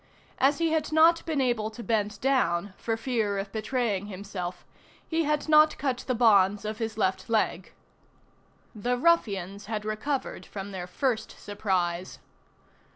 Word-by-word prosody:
As 280 +2 +4
he 330 -1 +1
had 315 -1 0
not 325 +2 +5
been 310 -3 0
able 240 -5 +1
to 220 +2 -9
bend 210 -2 -1
down, 205 -8 +1
for 225 -1 -2
fear 225 -4 -1
of 195 0 -4
betraying 220 -3 -1
himself, 185 -3 -6 0.4
he 325 -1 0
had 300 0 0
not 305 0 +6
cut 260 -3 -2
the 255 - +1
bonds 205 -3 +4
of 215 0 -4
his 225 -1 -3
left 190 -1 0
leg. 225 -1 0 1.0
The 245 +3 -1
ruffians 205 - +1
had 215 -1 -3
recovered 220 +6 -3
from 200 0 -7
their 180 -2 -5
first 225 +3 -2
surprise. 185 -3 -2
220 Hz, 150 wpm, -27 LUFS, 200-265 Hz, 1.0 s, not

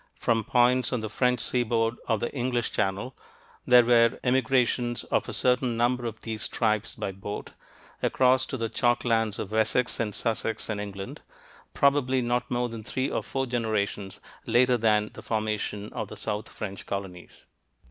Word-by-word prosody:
from 115 -1 +1
points 125 +2 +3
on 125 -3 -1
the 110 - -4
French 125 +1 +2
seaboard 115 -1 +1
of 110 -3 +1
the 120 - -3
[English] 125 -3 -1
Channel... 100 +5 -1 0.5
there 125 -1 +7
were 115 0 +4
emigrations 125 -2 +1
of - - -1
a - - -3
certain 125 -2 +1
number 120 +1 +1
of 110 -1 -7
these 110 -2 -3
tribes 110 -1 0
by 95 - -3
boat, 95 +2 -7 0.5
across 130 0 +3
to 130 - -4
the 115 -1 -1
chalk 120 +2 +1
lands 115 -3 +1
of 100 - -5
Wessex 110 +3 +1
and 105 -3 -2
Sussex 110 -1 -2
[in 105 - -3
England], 100 -1 -6 0.5
probably 140 -2 +3
not 120 0 -1
more 120 0 0
than 115 -2 -7
three 130 +5 -2
or - - 0
four 135 0 -2
generations 110 -5 -2 0.3
later 125 +2 +4
than 105 -2 +2
the - - -10
formation 105 -1 -3
of - - -3
the - - -9
south 105 +1 -3
French 100 -2 -7
colonies." 95 -3 -6
115 Hz, 170 wpm, -27 LUFS, 110-125 Hz, 0.5 s, there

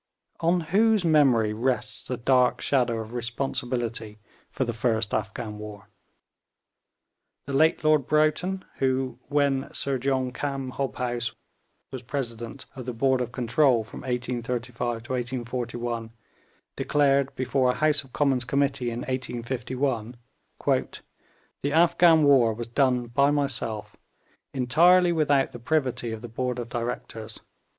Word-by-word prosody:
On 170 +2 +2
whose 205 +4 +3
memory 130 -9 +4
rests 110 -2 -1
the 125 - -3
dark 125 +1 +3
shadow 125 -4 +1
of 110 +1 -7
responsibility 120 -2 -3 0.3
for 130 - -2
the 120 - -2
first 110 -2 0
Afghan 105 +1 -3
war? 105 -1 -9 1.6
The 140 - -5
late 160 +4 +3
Lord 155 -3 +3
Broughton, 155 +6 +1
who, 130 -2 0
when 140 -1 +1
Sir 135 -2 -1
John 130 -1 0
Cam 135 0 -3
Hobhouse, 120 -2 -3 0.6
was 130 - -6
President 120 -1 -5
of 130 -1 -8
the 125 - -3
Board 130 +2 +2
of 120 - -3
Control 125 0 +2
from 110 - -10
1835 120 -1 -3
to 120 - -9
1841, 120 -2 -3 0.7
declared 140 -2 +2
before 130 0 +1
a 125 - +1
House 150 +1 +2
of 135 - -19
Commons 135 -3 +1
Committee, 135 -1 0
in 120 +1 -4
1851, 125 -1 -3 0.5
'The 145 - -4
Afghan 165 0 +5
war 130 -6 +5
was 120 +1 -5
done 125 0 +2
by 140 +4 +2
myself; 115 -7 -2 0.6
entirely 175 +8 +4
without 145 -4 +2
the 120 - -9
privity 130 -3 -1
of 110 -1 -6
the - - -5
Board 125 +2 -3
of 120 -1 -5
Directors.' 115 -2 -5
125 Hz, 130 wpm, -26 LUFS, 120-140 Hz, 1.6 s, Afghan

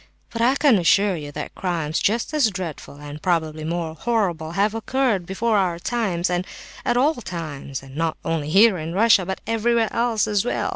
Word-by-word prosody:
But 230 -1 -4
I 250 +3 +4
can 275 -7 +4
assure 195 +3 +3
you 145 -3 -7
that - - -6
crimes 165 -4 -2
just 230 +7 0
as 290 -7 +3
dreadful, 180 -7 -6
and 145 +1 -9
probably 160 -3 -1
more 165 0 -3
horrible, 170 -5 -1
have 205 +3 +1
occurred 225 -5 0
before 215 +3 +1
our 180 -3 0
times, 185 -4 -1
and 180 +1 -1 0.4
at 240 - +1
all 285 +5 +4
times, 150 - -6
and 135 0 -13
not 165 0 -1
only 155 -3 -1
here 195 +2 +5
in 160 +2 -5
Russia, 200 -2 +4
but 190 - -4
everywhere 230 0 +1
else 230 -2 +1
as 210 -2 +1
well. 245 - -1
185 Hz, 190 wpm, -22 LUFS, 165-225 Hz, 0.4 s, here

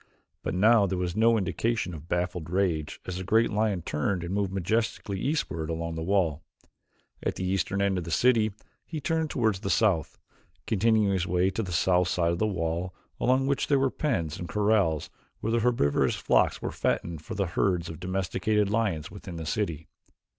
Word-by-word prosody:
But - - -3
now 105 +2 +5
there 95 0 -2
was 90 -1 -2
no 115 +1 +4
indication 110 -1 -1
of 80 0 -9
baffled 90 -2 -2
rage 85 -5 0
as 90 -1 -4
the 95 - -4
great 115 +5 +3
lion 105 -4 0
turned 85 +4 -1
and 85 +2 -4
moved 100 -2 0
majestically 100 +1 -1
eastward 90 - -2
along 85 0 -3
the 80 - -4
wall. 85 -4 +1 0.8
At - - -2
the - - -4
eastern 95 +1 0
end 95 -2 +1
of - - -5
the - - -6
city 110 +4 +3 0.3
he 160 - -5
turned 160 +2 0
toward 110 -8 +1
the 100 - -4
south, 100 -8 +2 0.5
continuing 110 -1 +2
his 90 -2 0
way 90 +2 +2
to 115 - -2
the 95 -5 -5
south 90 0 +3
side 85 -2 +1
of 85 - -2
the 110 - +2
wall 90 -1 -2 0.2
along 130 +2 +2
which 140 0 0
were 140 - +4
the 135 -1 +2
pens 85 - -1
and 85 - -6
corrals 100 -7 +1 0.3
where 110 - -2
the 115 - +2
herbivorous 115 -12 +2
flocks - - +2
were - - -2
fattened 85 -3 -1
for 110 +7 -7
the 100 -1 0
herds 90 0 0
of 80 -1 -7
domesticated 95 +3 0
lions 100 -9 0
within 100 -3 -9
the 80 -1 -5
city. 80 -3 -2
95 Hz, 190 wpm, -27 LUFS, 85-110 Hz, 0.8 s, now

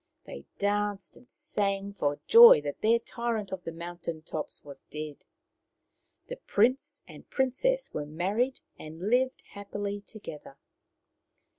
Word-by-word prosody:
They 70 - -9
danced 205 -1 -1
and 245 - -17
sang 200 -9 -2
for 145 -7 -1
joy 465 - +10
that 145 -1 -5
their 225 +2 +4
tyrant 235 -4 -3
of 190 -2 -6
the 165 - -4
mountain 170 -1 -6
tops 155 -1 -5
was 140 -2 -11
dead. 150 -1 -7 1.0
The - - -7
prince 255 - +1
and - - -14
princess 295 - 0
were 145 -1 -4
married 200 - -1 0.2
and 165 +7 -5
lived 255 +1 +2
happily 205 0 -5
together. 155 -10 -10
200 Hz, 130 wpm, -29 LUFS, 165-240 Hz, 1.0 s, joy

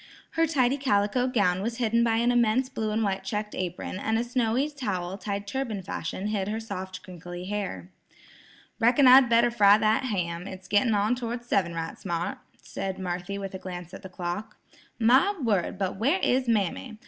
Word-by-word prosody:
Her 330 0 +2
tidy 270 -3 +2
calico 245 -1 +1
gown 200 -8 +1
was 230 +3 -3
hidden 235 -1 +2
by 230 -1 +2
an 235 +2 +2
immense 240 +2 +2
blue 220 -4 -3
and 220 +1 0
white 195 -2 -1
checked 210 +1 -3
apron, 185 +1 -4
and 220 +2 0
a 230 - +1
snowy 245 +2 0
towel 195 -10 -3
tied 200 -1 -4
turban 220 -3 -3
fashion 185 0 -4
hid 200 -3 -1
her 215 +2 -2
soft 190 -4 -6
crinkly 175 0 -8
hair. 185 - -4 0.9
"Reckon 245 +4 +5
I'd 255 -1 +8
better 235 +1 +4
fry 205 -3 +6
that 220 +4 +2
ham; 180 -5 -2
it's 190 -1 -9
gittin' 210 +2 +3
on 205 +3 +2
toward 240 -1 -4
seven 185 -8 0
right 165 0 -5
smart," 175 -3 -3 0.2
said 190 -1 -4
Marthy 180 +1 -4
with 195 -1 -6
a 190 - -5
glance 180 -2 -8
at - - -8
the 190 - -9
clock. 185 +4 -5 0.4
"My 260 - +4
word, 205 - 0
but 190 -1 -2
where 275 - +2
is 255 0 +2
mammy! 220 +1 -1
210 Hz, 185 wpm, -27 LUFS, 185-240 Hz, 0.9 s, I'd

